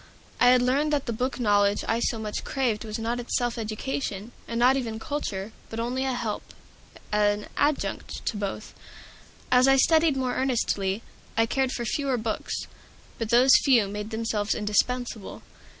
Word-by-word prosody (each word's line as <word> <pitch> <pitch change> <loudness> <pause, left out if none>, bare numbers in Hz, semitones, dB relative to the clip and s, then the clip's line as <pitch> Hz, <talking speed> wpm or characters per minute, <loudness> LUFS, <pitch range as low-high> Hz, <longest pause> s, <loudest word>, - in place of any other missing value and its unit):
I 245 - +5
had 250 0 +6
learned 280 +5 +2
that 285 -2 0
the 235 - -2
book 255 +4 -2
knowledge 205 -3 +3
I 225 - +1
so 235 - 0
much 215 -1 -4
craved 245 -6 -1
was 215 0 -4
not 230 +2 -2
itself 240 0 -1
education, 220 -1 -4 0.2
was 230 - -3
not 250 +3 +5
even 230 -5 -3
culture, 220 -7 -4 0.2
but 225 - -5
only 250 +3 -1
a 265 - 0
help, 235 -4 -3 0.7
an 210 0 +2
adjunct 290 0 -1
to - - -1
both. 205 +1 -4 0.8
As 250 +1 +6
I 270 - +6
studied 315 +1 +4
more 255 -1 -1
earnestly, 220 -6 0 0.3
I 225 - +4
cared 265 +2 0
for 240 - -3
fewer 270 +2 0
books, 220 -1 -3 0.6
but 230 -2 -2
those 245 +3 +6
few 240 -7 +4
made 210 +1 -5
themselves 220 -2 -1
indispensable. 220 +1 -1
235 Hz, 165 wpm, -26 LUFS, 215-255 Hz, 0.8 s, had